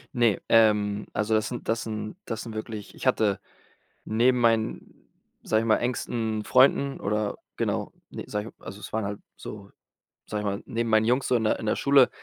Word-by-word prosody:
Ne, 120 -5 +3
ähm, 105 -2 +3
also 105 +1 0
das 110 -1 +2
sind 120 - -6
das 115 0 +1
sind 110 +1 -5
das 115 -1 -4
sind 115 - -7
wirklich 110 -1 -6
ich - - -4
hatte 105 -6 +2 0.7
neben 120 +3 +3
meinen, 115 -2 0 0.3
sage 110 0 +1
ich - - -3
mal, 110 - +4
engsten 115 -3 -2
Freunden 135 +1 +4
oder 105 0 -1 0.2
genau, - - -1 0.2
ne, - - -6
sage 105 +2 -4
ich - - -20
also 100 - -8
es - - -9
waren 110 -1 -1
halt 100 0 -4 0.2
so, 100 -2 -9 0.5
sage 105 -1 -3
ich - - -5
mal, 100 0 -2
neben 115 -2 -2
meinen 110 0 +4
Jungs 125 +4 +2
so 125 - +3
in 115 - +1
der 110 - +1
in 110 - -4
der - - +2
Schule 140 -2 +5
110 Hz, 200 wpm, -26 LUFS, 105-120 Hz, 0.7 s, Schule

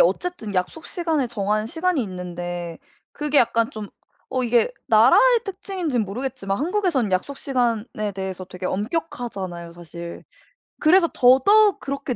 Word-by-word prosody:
어쨌든 360 - 0
약속 185 - -2
시간에 325 -7 -1
정한 215 -1 -1
시간이 330 0 0
있는데 175 -3 -6 0.3
그게 295 -1 +1
약간 230 -1 +2
좀 210 -2 -7 0.5
어 255 - +1
이게 240 - +2
나라의 - - +6
특징인지는 350 - -2
모르겠지만 205 -2 -3
한국에서는 325 - 0
약속 270 +10 -1
시간에 230 -6 -1
대해서 190 -1 -5
되게 185 0 -9
엄격하잖아요 195 - -4
사실. 170 0 -9 0.6
그래서 335 +2 +5
더더욱 385 +12 +5
그렇게 275 -2 -4
240 Hz, 340 characters per minute, -23 LUFS, 190-320 Hz, 0.6 s, 나라의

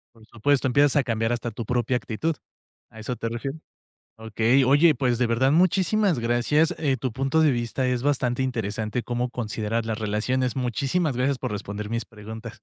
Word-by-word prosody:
Por 110 - -18
supuesto, 130 +4 +1
empiezas 140 +3 +3
a 140 - +4
cambiar 115 0 -1
hasta 120 0 -2
tu 115 +1 -6
propia 125 +1 0
actitud. 135 +8 -2 0.5
A 110 - -13
eso 120 +3 -4
te 115 - -4
refieres. 135 +6 -5 0.6
Okey, 110 +4 +2
oye, 145 +5 +5
pues 125 -3 +1
de 125 - +1
verdad 130 +4 +2
muchísimas 185 - +2
gracias, 120 +7 +2
eh, 140 -4 +1
tu 130 -1 -3
punto 135 +6 +1
de 155 -3 +5
vista 120 +2 -1
es 125 -1 0
bastante 130 -3 0
interesante 110 -1 -2
cómo 120 +1 -2
considerar 115 -1 -3
las 110 -1 -3
relaciones. 110 +4 -1
Muchísimas 135 - -1
gracias 135 +1 +1
por - - -4
responder 105 +1 -5
mis 115 0 -2
preguntas. 110 +1 -9
125 Hz, 180 wpm, -25 LUFS, 115-135 Hz, 0.6 s, oye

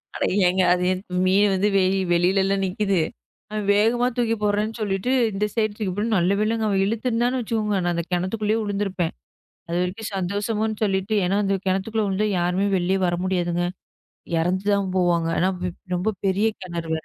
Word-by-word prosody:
அட - - -2 0.2
ஏங்க 185 +1 +3
அது 180 - 0
எது 185 0 -2 0.2
மீன் 200 +2 +4
வந்து 190 +2 +2
வெளி 190 0 +2
வெளிலல்ல 190 +3 +3
நிக்குது. 195 -1 0 0.5
அவன் 215 -1 -3
வேகமா 235 +4 +3
தூக்கி 230 -2 +1
போடுறேன்னு 210 +2 +1
சொல்லிட்டு 200 +4 -1 0.2
இந்த 200 +1 -1
சைடு 215 -2 +1
தூக்கிபோட்டு 210 +2 -1
நல்லவேளைங்க 210 +5 +1
அவன் 195 -2 +2
இழுத்து 225 +4 -2
இருந்தான்னு 245 +2 +1
வச்சுக்கோங்க. 215 -2 -1
நான் 175 - +1
அந்தக் 170 +1 -4
கிணத்துக்குள்ளயே 210 +5 0
விழுந்து 205 -1 -1
இருப்பேன். 180 -3 -2 0.6
அதுவரைக்கும் 180 +6 -2
சந்தோஷம்னு 210 +3 -2
சொல்லிட்டு 195 +1 0
ஏன்னா 195 +3 +1
அந்தக் 195 -1 -1
கிணத்துக்குள்ள 205 +3 0
விழுந்தா 200 +2 0
யாருமே 180 +3 +1
வெளிய 185 +2 +1
வர 175 - 0
முடியாதுங்க. 175 -2 0 0.7
இறந்து 180 +4 0
தான் 195 -2 -1
போவாங்க. 175 -2 +2
ஏன்னா 185 +2 +2
ர - - 0 0.3
ரொம்ப 180 +4 0 0.2
பெரிய 200 +3 +2
கிணறு 170 -2 -5
வேற. 160 - -8
195 Hz, 165 wpm, -23 LUFS, 180-215 Hz, 0.7 s, மீன்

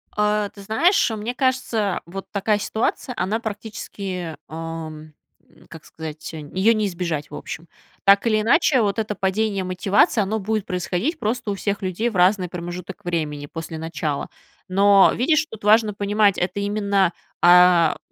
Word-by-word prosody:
А, 210 0 +1
ты 200 - -14
знаешь, 325 - +2
мне 220 +2 -3
кажется, 250 -7 0
вот 190 +3 -7
такая 205 +1 +1
ситуация, 220 +4 -2
она 210 +4 -1
практически, 200 -5 -6
ам, 160 -1 -7 0.4
н - - -22
как 160 -2 -12
сказать, 160 0 -8
ее 185 +9 +1
не 215 -2 0
избежать, 170 -5 -4
в - - -7
общем. 165 +2 -7 0.4
Так 200 +3 +5
или 215 -1 +2
иначе, 255 +3 +3
вот 205 0 0
это 210 -1 -2
падение 195 +1 0
мотивации, 190 +4 +2
оно 210 +3 -1
будет 215 0 -2
происходить 180 - -2
просто 215 -2 -2
у - - -2
всех 200 +1 -2
людей 190 +5 -1
в 225 - -10
разный 180 0 +3
промежуток 180 +2 -7
времени 155 -4 -2
после 160 +2 -7
начала. 155 -2 -3 0.4
Но, 200 +1 +5
видишь, 310 +5 +2
тут 220 - -11
важно 215 0 +4
понимать: 205 0 +2
это 180 +3 -2
именно, 200 -3 +1 0.3
а, 175 -2 +6
200 Hz, 155 wpm, -22 LUFS, 175-215 Hz, 0.4 s, а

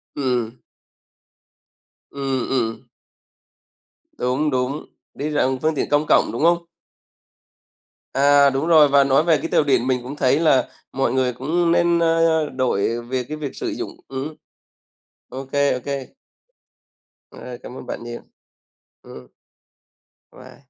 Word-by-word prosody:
Ừm. 125 -4 -2 1.5
Ừm, 135 -2 -2
ừm. 115 -4 -2 1.3
Đúng, 130 +5 0
đúng, 130 +3 -2 0.3
đi 150 +2 -4
rằng 135 -3 0
phương 155 0 +1
tiện - - -2
công 145 +1 +2
cộng, - - +4
đúng - - -3
không? 170 0 +3 1.5
À, 140 0 +5
đúng 135 +4 -2
rồi. 155 -3 +7
Và 140 0 +5
nói 135 +3 +3
về 165 -3 +3
cái - - -4
tàu 155 - +2
điện 130 -3 +1
mình 125 -2 0
cũng 135 +4 -7
thấy 140 +2 +2
là 140 -6 +3 0.3
mọi 130 -2 0
người 130 -2 +1
cũng 165 +7 0
nên, 170 0 +3
a, 165 0 +2 0.4
đổi 120 -2 0
về 125 +1 -3
cái 150 +4 -7
việc 145 -3 -6
sử - - -4
dụng - - -5 0.2
ừm, 135 +4 -5 0.9
OK, 135 0 -8 0.2
OK. 140 +2 -3 1.4
À, 125 -1 -9
cảm 125 - -9
ơn - - -9
bạn - - -6
nhiều. 120 0 -7 0.8
Ừm. - - -12 1.1
Bye. - - -15
135 Hz, 135 wpm, -21 LUFS, 125-155 Hz, 1.5 s, rồi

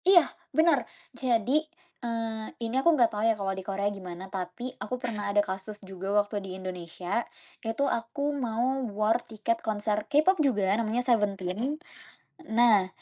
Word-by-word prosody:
Iya, 360 -4 +8 0.3
benar. 320 -3 +6 0.3
Jadi, 245 +3 +2 0.4
eee, 225 -2 -2 0.2
ini 225 - -3
aku 340 - +5
enggak 235 -4 +4
tahu 210 - -2
ya 225 - +2
kalau 195 -1 -1
di 190 - -5
Korea 195 +1 -2
gimana, 185 -2 -7
tapi 195 +7 -4
aku 250 - -3
pernah 220 -5 -3
ada 205 0 +3
kasus 190 +3 -5
juga 190 0 -5
waktu 205 0 +1
di 195 - -7
Indonesia. 180 +2 -3 0.4
Itu 225 +5 0
aku 280 +4 -1
mau 255 0 0 0.2
war 220 +3 +3
tiket 230 +1 -2
konser 210 -1 -1
K-pop 310 +4 +4
juga, 205 -9 +3
namanya 230 +2 0
Seventeen. 210 +3 +1 0.7
Nah, 220 -4 +5
220 Hz, 150 wpm, -28 LUFS, 195-245 Hz, 0.7 s, Iya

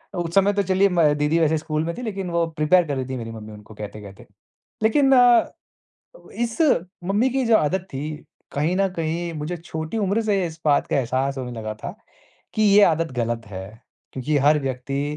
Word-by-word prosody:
अ, - - -5
उस 170 -1 -3
समय 200 +1 +4
तो 200 0 +1
चलिए 190 +1 +3
म 175 -1 +2
दीदी 150 +3 +1
वैसे 160 0 +2
स्कूल 155 0 -2
में 170 - -2
थी - - -5
लेकिन 195 -6 -4
वो 170 0 +1
प्रिपेयर 175 +4 +4
कर 140 - -2
रही 130 -1 -3
थी 130 - -3
मेरी 115 -1 -6
मम्मी 110 -1 -9
उनको 105 +1 -13
कहते-कहते। 105 -1 -9 0.6
लेकिन 270 +5 +3
अ, 245 -1 +6 0.9
इस 235 +6 -3 0.4
मम्मी 210 +7 +1
की 265 0 0
जो 225 -1 +5
आदत 180 +3 0
थी 145 +3 -4 0.4
कहीं 155 +6 0
न 195 0 +2
कहीं 165 +1 -2
मुझे 155 +4 -4
छोटी 160 +4 -5
उम्र 205 +2 +1
से 200 -4 +1
इस 160 0 -9
बात 145 -2 +3
का - - 0
एहसास 135 +2 -1
होने 125 -1 -5
लगा 110 0 -4
था 110 - -7 0.6
कि 215 - -1
ये 205 0 +6
आदत 165 -3 +2
गलत 115 -1 -2
है। 95 -1 -7 0.5
क्योंकि 145 +3 -1
हर 150 0 +5
व्यक्ति 135 +1 -3
160 Hz, 200 wpm, -23 LUFS, 135-195 Hz, 0.9 s, अ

